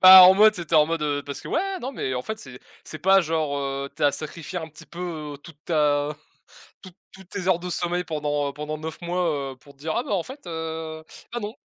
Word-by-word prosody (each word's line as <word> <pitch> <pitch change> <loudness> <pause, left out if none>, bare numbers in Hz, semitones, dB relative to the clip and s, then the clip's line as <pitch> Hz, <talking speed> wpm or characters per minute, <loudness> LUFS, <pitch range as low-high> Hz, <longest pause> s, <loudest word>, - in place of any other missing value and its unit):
Bah 185 0 +12
en 185 - +8
mode, 215 +2 +7
c'était 170 -4 -3
en 150 -1 +7
mode 165 -1 -1
heu, 145 -1 0
parce 140 - -6
que - - -9
ouais, 385 +2 0
non 260 +3 -4
mais 130 - -2
en 125 - -2
fait 220 +7 -5
c'est, 130 - -10 0.3
c'est 155 - -7
pas 190 +4 +5
genre, 155 -4 0
heu, 140 0 -3
tu - - -6
as 145 - +5
sacrifié 165 +3 -5
un 160 -2 -6
petit 155 0 -14
peu, 170 -4 -5
heu, - - -10
toute 150 +1 -15
ta 150 -2 +2 0.7
tou 185 - -11 0.2
toute 190 -1 -15
tes 185 -2 -4
heures 185 -2 +4
de 180 +1 -5
sommeil 175 0 -1
pendant 150 -2 -1
heu, - - -8
pendant 150 +1 -4
9 160 +2 -7
mois, 170 -6 -1
heu, - - -17
pour 140 +2 -17
dire 155 +3 -4
«Ah 240 - +1
bah 265 - -6
en 185 -4 +1
fait, 270 -1 -10
heu, 160 -1 -5 0.3
bah 240 - -1
non». 210 +1 -4
160 Hz, 250 wpm, -25 LUFS, 145-180 Hz, 0.7 s, Bah